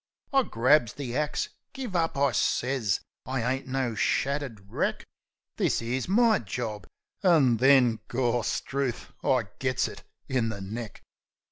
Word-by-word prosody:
I 270 - +6
grabs 125 - +3
the 130 -4 -5
axe. 150 +1 -1 0.2
"Give 250 -8 -5
up," 165 -4 +1
I 140 0 +3
sez. 125 -6 +1 0.3
"I 130 -1 0
ain't 135 0 -5
no 130 -2 -1
shattered 135 -2 -1
wreck. - - -1 0.5
This - - +1
'ere's 120 +2 -2
my 225 +1 +4
job." 110 0 -5 0.3
An' 150 - +5
then, 125 -2 +5
Gawstruth! 125 +1 -1
I 130 -3 +3 0.2
gits 130 -1 +1
it - - -9 0.3
in 125 -4 0
the 105 -2 -5
neck! 110 +3 -7
130 Hz, 135 wpm, -27 LUFS, 115-140 Hz, 0.5 s, I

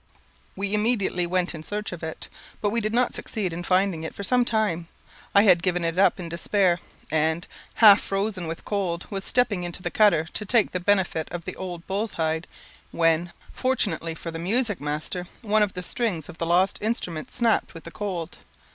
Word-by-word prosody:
We 200 +1 -3
immediately 210 -5 +1
went 180 0 0
in 160 - -7
search 210 +6 -4
of 175 - -7
it; 160 0 -6 0.3
but 205 - 0
we 230 +1 0
did 215 0 -1
not 245 +2 +2
succeed 195 -6 -3
in 170 - -4
finding 185 -2 +2
it 160 - -6
for 200 - -5
some 245 +5 +3
time. 215 -8 0 0.5
I 200 - +8
had 180 -5 +6
given 180 -1 0
it 165 +2 -1
up 195 - +4
in 175 - -5
despair, 175 +2 +1 0.3
and, 160 +2 +1 0.3
half 210 -3 +8
frozen 195 -3 -2
with 165 0 -6
cold, 185 -4 -2
was 195 -1 -3
stepping 225 -6 +1
into 175 +1 -5
the - - -2
cutter 205 -7 +4
to - - -1
take 215 +1 +2
the 180 - -2
benefit 185 -4 +1
of 175 -1 -6
the - - -5
old 175 -2 -6
bull's 205 +3 -2
hide, 160 +1 -1 0.4
when, 165 +1 +2 0.2
fortunately 190 -11 0
for 165 - -6
the 165 - -6
music 205 - 0
master 155 +5 -3 0.2
one 215 0 +3
of 205 -2 +2
the 180 - -5
strings 180 - -2
of 175 - -11
the 165 - -1
lost 180 +3 +3
instrument 180 -8 -2
snapped 230 -7 +1
with 165 - -9
the 170 - -9
cold. 180 -5 -4
185 Hz, 200 wpm, -25 LUFS, 170-210 Hz, 0.5 s, I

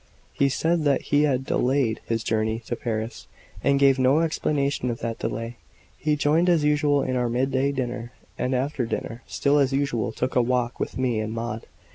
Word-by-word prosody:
He 140 - +2
said 160 +5 +1
that 140 -2 +3
he 145 +1 +5
had 135 -2 0
delayed 125 -4 +1
his 115 -1 -1
journey 110 0 0
to 120 - -4
Paris, 115 -1 -4 0.4
and 140 0 +3
gave 135 -1 +5
no 130 +5 +4
explanation 145 -5 0
of 115 - -2
that 115 -1 -3
delay. 115 +1 -4 0.4
He 150 0 0
joined 155 +5 +2
as 165 -4 +3
usual 145 -1 +3
in 130 - -1
our 125 -1 +1
midday 130 +3 +1
dinner; 120 -3 -4 0.2
and 125 +1 -1
after 130 -1 -1
dinner, 115 +1 -4
still 145 +1 +2
as 135 -1 +2
usual, 135 -5 0
took 125 +1 -3
a 125 - +5
walk 125 0 0
with - - -3
me 125 -4 0
and 110 0 -3
Maud. 115 -1 -4
130 Hz, 190 wpm, -25 LUFS, 120-140 Hz, 0.4 s, he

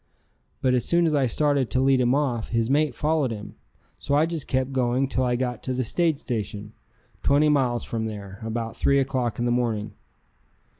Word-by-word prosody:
But 130 -1 +3
as 125 -2 +2
soon 170 +4 +2
as 160 - +1
I 140 -3 +2
started 140 0 +1
to 130 - 0
lead 135 -1 +3
him 125 +1 +3
off, 125 -6 -1
his 115 +1 0
mate 145 -3 +2
followed 150 -2 +1
him, 105 -2 -7 0.5
so 140 - 0
I 150 +2 +4
just 165 -3 -5
kept 130 0 0
going 130 +1 +1
till 130 -1 -1
I 125 -1 +1
got 125 0 -2
to 130 - -3
the 130 0 -1
stage 160 +5 +1
station, 105 -5 -5 0.5
twenty 145 +2 +3
miles 130 -5 +1
from 110 -1 -3
there, 100 -2 -8
about 115 0 -4
3 140 - +2
o'clock 130 -4 0
in 120 - -1
the 120 - +1
morning. 115 -4 -1
130 Hz, 200 wpm, -25 LUFS, 115-140 Hz, 0.5 s, I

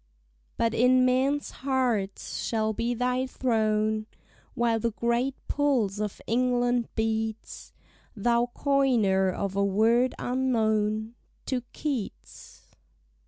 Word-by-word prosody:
But 230 -1 +1
in 255 +2 +4
men's 265 +3 +1
hearts 250 -7 -1
shall 220 -1 0
be 235 +3 -1
thy 250 +2 0
throne, 215 -3 0 0.5
While 235 -2 +1
the 230 0 -1
great 235 +4 0
pulse 250 -9 +1
of 210 -2 -3
England 245 0 +1
beats: 220 0 -3 0.4
Thou 235 +3 +2
coiner 235 -9 +2
of 195 +1 -3
a 200 - +2
word 225 +6 +2
unknown 220 -4 0 0.3
To 255 -2 -1
Keats! 275 -9 -6
235 Hz, 105 wpm, -27 LUFS, 215-255 Hz, 0.5 s, in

